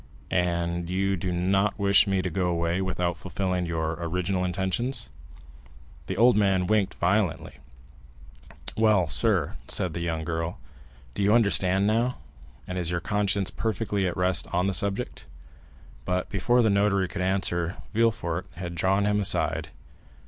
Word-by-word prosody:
"And 85 -1 0
you 95 +1 0
do 95 0 -3
not 95 +3 +1
wish 100 0 +4
me 95 -1 +1
to 90 - -2
go 90 +1 0
away 85 +1 0
without 90 -2 -1
fulfilling 90 +1 -2
your 80 -1 -1
original 90 +2 -1
intentions?" 95 +8 -2 1.0
The 95 - -3
old 120 +2 +5
man 95 -3 +2
winked 105 -1 +1
violently. 90 -4 0 1.2
"Well, 105 -5 +3
sir," 80 - +1
said 90 -3 -1
the 85 - -4
young 80 -1 -2
girl, 80 +1 -3 0.6
"do - - -3
you 100 +1 +3
understand 100 -4 +3
now, 115 +4 +1 0.5
and 90 0 -3
is 85 -2 -1
your 85 0 -1
conscience 100 +1 0
perfectly 105 -3 -1
at 90 - -3
rest 90 0 +2
on 90 +1 +1
the 100 - 0
subject?" 100 +1 -1 0.8
But 90 0 -2
before 120 +6 +2
the 110 - +3
notary 100 -1 +2
could 90 - -5
answer, 90 -2 0 0.2
Villefort 105 -6 0
had 90 0 -6
drawn 95 +4 +1
him 105 0 +2
aside. 100 0 +1
95 Hz, 150 wpm, -26 LUFS, 85-100 Hz, 1.2 s, old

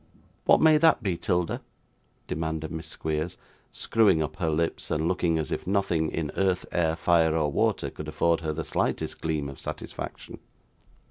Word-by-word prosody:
'What - - +6
may 155 -1 +6
that 160 -7 +4
be, 95 -4 0
'Tilda?' 90 0 -1 0.6
demanded 80 0 -3
Miss 80 -1 -5
Squeers; 80 +1 -3 0.3
screwing 100 -8 +3
up 75 - -6
her 85 -3 0
lips, 80 +1 -1
and 80 +1 0
looking 85 -2 +1
as 80 -2 -3
if - - -3
nothing 90 -5 +1
in 80 -3 -3
earth, 95 -2 +1
air, 80 -2 +1
fire, 80 -2 +3
or 75 -2 +1
water, - - 0
could - - -8
afford 85 -1 +1
her 80 -1 -2
the 80 +1 -3
slightest - - -1
gleam 80 -3 -1
of 70 - -8
satisfaction. - - -7
80 Hz, 170 wpm, -27 LUFS, 80-90 Hz, 0.6 s, What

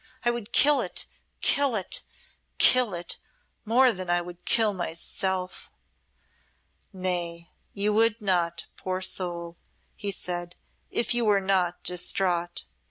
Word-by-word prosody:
I 240 - +4
would 235 -2 -6
kill 295 0 +5
it - - -3 0.4
kill 280 -4 +3
it 190 -4 0 0.6
kill 250 -7 +5
it 175 0 -3 0.5
more 250 +3 +5
than 185 -4 -6
I 175 0 +3
would 175 0 -9
kill 220 -3 +3
myself!" 185 +1 -3 1.2
"Nay, 175 -3 -3 0.2
you 210 +1 0
would 225 +1 +3
not, 175 -5 0
poor 185 0 -3
soul," 170 -2 -3 0.4
he 205 - -4
said, 175 -2 -3 0.3
"if 235 - +1
you 240 0 +1
were 205 -2 +4
not 190 -2 +1
distraught." 175 -1 0
185 Hz, 125 wpm, -27 LUFS, 175-215 Hz, 1.2 s, kill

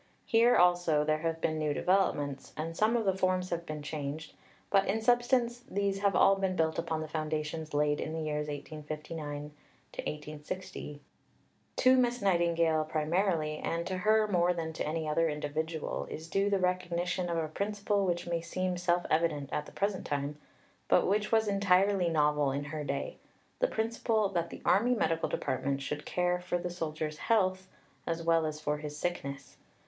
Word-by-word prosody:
Here 235 +2 +5
also 175 -4 +4
there 155 0 +1
have 165 0 -2
been 155 -1 0
new 150 -1 0
developments, 145 -8 0
and 165 +2 -4
some 220 +6 +3
of 225 - -1
the 190 -1 +2
forms 185 -1 0
have 170 0 -3
been 150 -1 -5
changed; 150 0 -5 0.4
but 195 -1 +4
in 215 +3 +1
substance, 240 +1 +2
these 200 0 0
have 200 -1 +2
all 195 0 +6
been 190 -1 0
built 160 -2 +1
upon 165 -1 -2
the 155 - -4
foundations 155 0 -3
laid 150 0 +2
in 155 - -3
the 160 0 -3
years 150 -1 -2
1859 150 0 -6 0.9
60. 150 -4 -6 0.7
To 255 0 +5
Miss 245 -1 +2
Nightingale 170 -4 +2
primarily, 155 0 0
and 170 +1 -2
to 185 0 -2
her 215 +3 +3
more 180 -3 +3
than 160 -1 -3
to - - -3
any 160 0 -2
other 165 +2 +2
individual, 155 +1 -3
is 160 +1 -7
due 195 +3 +1
the 200 - +2
recognition 180 -1 -1
of 170 - -1
a 160 -1 0
principle 205 +4 -1
which 175 0 -1
may 170 -1 -1
seem 180 +2 -2
self 175 0 +1
evident 155 -3 +1
at 150 - -2
the - - -11
present 200 -1 -2
time, 145 +1 -2 0.5
but - - +4
which 210 +2 +1
was 220 -1 +3
entirely 195 -2 +3
novel 150 -3 +2
in 140 +2 -2
her 150 +1 -5
day - - -3 0.4
the - - +3
principle 220 - 0
that 170 -3 -1
the - - -10
Army 240 +6 +4
Medical 165 -7 0
Department 135 +1 -1
should 145 +2 -5
care 180 0 +1
for 180 0 -1
the 175 0 -4
soldier's 155 -3 -4
health 190 -4 +1 0.4
as 165 0 -2
well 165 -1 +3
as 150 0 -5
for 150 -1 -1
his 150 -1 -6
sickness. 140 -6 -4
170 Hz, 175 wpm, -31 LUFS, 155-195 Hz, 0.9 s, all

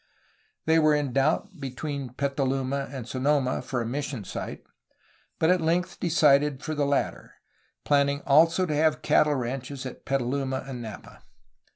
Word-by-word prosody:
They 160 +1 +4
were 155 -1 +4
in 145 -4 -1
doubt 160 - 0
between 135 -1 -5
Petaluma 135 0 -1
and 130 -4 -6
Sonoma 130 0 +1
for 125 -1 -3
a - - -3
mission 135 -1 -3
site, - - -6 0.7
but 160 +2 +3
at 180 -1 +2
length 175 +2 0
decided 150 -4 +3
for 155 - -3
the 145 -2 0
latter, 140 0 -2 0.5
planning 140 0 +2
also 165 +6 +5
to 155 - -2
have 155 +1 +2
cattle 150 -1 +3
ranches 130 +2 -4
at 130 - -8
Petaluma 135 0 -1
and 130 -3 -6
Napa. 110 -3 -10
140 Hz, 150 wpm, -26 LUFS, 130-150 Hz, 0.7 s, also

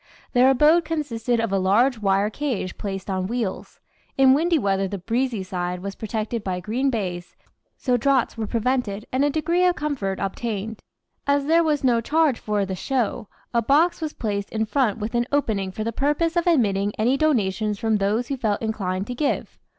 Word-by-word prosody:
Their 250 +1 +5
abode 300 +6 +5
consisted 245 -8 -1
of 225 -3 -1
a 195 - +2
large 225 +7 +3
wire 200 +1 +1
cage 245 -9 -3
placed 195 -2 -4
on 185 -2 -1
wheels. 230 -3 -4 0.4
In 265 -1 +6
windy 330 +4 +2
weather 195 -6 0
the 200 - -4
"breezy 230 +2 -1
side" 180 -1 -3
was 200 0 -4
protected 220 +1 -3
by 185 -1 -2
green 235 +9 -1
baize, 180 -7 -4 0.4
so 250 -2 +1
draughts 270 0 +1
were 225 -2 -3
prevented, 230 -3 -1
and 260 +2 +1
a 290 - +3
degree 335 +4 +1
of 360 -1 +3
comfort 255 -11 -2
obtained. 215 +1 -3 0.5
As 280 0 +2
there 330 +3 +4
was 300 -3 0
no 240 -3 +3
charge 300 0 +2
for 210 -2 -1
"the 190 - -4
show," 240 +1 -2 0.3
a 235 - +3
box 315 +9 +3
was 310 -1 -3
placed 200 -2 -3
in 220 0 -1
front 235 -3 +1
with 220 +2 -4
an 240 0 +1
opening 215 -10 0
for 215 - -4
the 230 +1 -3
purpose 295 +6 0
of 345 0 +1
admitting 205 - +2
any 240 +5 +2
donations 215 -8 +1
from 220 0 +1
those 210 +5 0
who 275 - -2
felt 215 -5 0
inclined 195 -4 -2
to 245 - -5
give. 280 +3 -2
230 Hz, 190 wpm, -23 LUFS, 200-275 Hz, 0.5 s, In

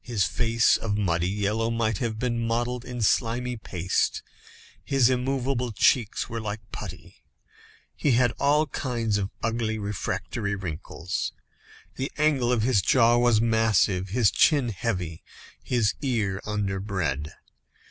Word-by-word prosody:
His 115 -5 0
face 115 0 +2
of 105 -2 -2
muddy 90 -3 +1
yellow 105 +3 0
might 115 -3 0
have 115 -2 -2
been 120 0 -1
modelled 120 +1 -1
in 125 -2 -4
slimy 120 +3 +1
paste 95 -5 -1 0.6
his 135 -3 +3
immovable 125 -1 -1
cheeks 110 +2 +2
were 115 0 -4
like 105 -1 -6
putty; - - -9 0.7
he 140 - +1
had 120 0 +3
all 150 +2 +3
kinds 115 -7 -1
of 95 -1 -2
ugly 110 -1 -1
refractory 100 0 -3
wrinkles; 90 0 -4 0.6
the 135 - -3
angle 145 -5 +2
of 115 -3 +1
his 115 -5 +3
jaw 120 +3 +4
was 120 -3 +4
massive, 110 -4 +2
his 110 +1 +3
chin 145 -6 +3
heavy, 90 -5 -3 0.4
his 120 -4 +1
ear 110 -8 -1
underbred. 95 -8 -2
115 Hz, 130 wpm, -26 LUFS, 100-125 Hz, 0.7 s, jaw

